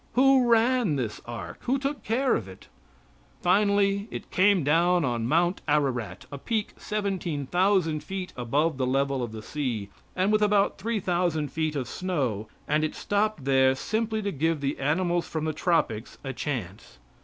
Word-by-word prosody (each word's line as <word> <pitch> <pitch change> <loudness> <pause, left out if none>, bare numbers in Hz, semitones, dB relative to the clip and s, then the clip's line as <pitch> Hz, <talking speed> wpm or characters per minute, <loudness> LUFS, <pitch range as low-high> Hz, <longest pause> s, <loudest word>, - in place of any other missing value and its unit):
Who 260 0 +5
ran 230 - +3
this 120 -6 -3
ark 115 -4 -7
who 260 +3 0
took 275 +1 -3
care 255 +4 +1
of 105 - -1
it? 95 - -13 0.8
Finally 200 +2 +3
it - - -8
came 190 -2 +4
down 170 +3 +3
on 120 -3 -1
Mount 175 +6 +2
Ararat, 135 -6 0
a 140 - -6
peak 220 - -2
seventeen 190 -8 -3
thousand 175 -2 +1
feet 190 +2 -5
above 140 +5 0
the 130 - +1
level 135 0 +1
of 120 -2 -3
the 110 -1 -8
sea, 120 -9 -3 0.3
with 210 +3 +2
about 205 -2 +2
three 225 +2 -1
thousand 175 -5 0
feet 155 -1 -1
of 130 -4 -2
snow, 130 - -2 0.2
and 150 +1 +2
it 155 - -2
stopped 205 -7 -1
there 130 -1 +4
simply 220 +7 -2
to 200 - -1
give 160 +1 0
the 140 0 -2
animals 170 +5 0
from 160 -1 -3
the 155 - -1
tropics 155 -9 0
a 135 -1 -4
chance. 105 - -5
165 Hz, 165 wpm, -27 LUFS, 135-200 Hz, 0.8 s, Who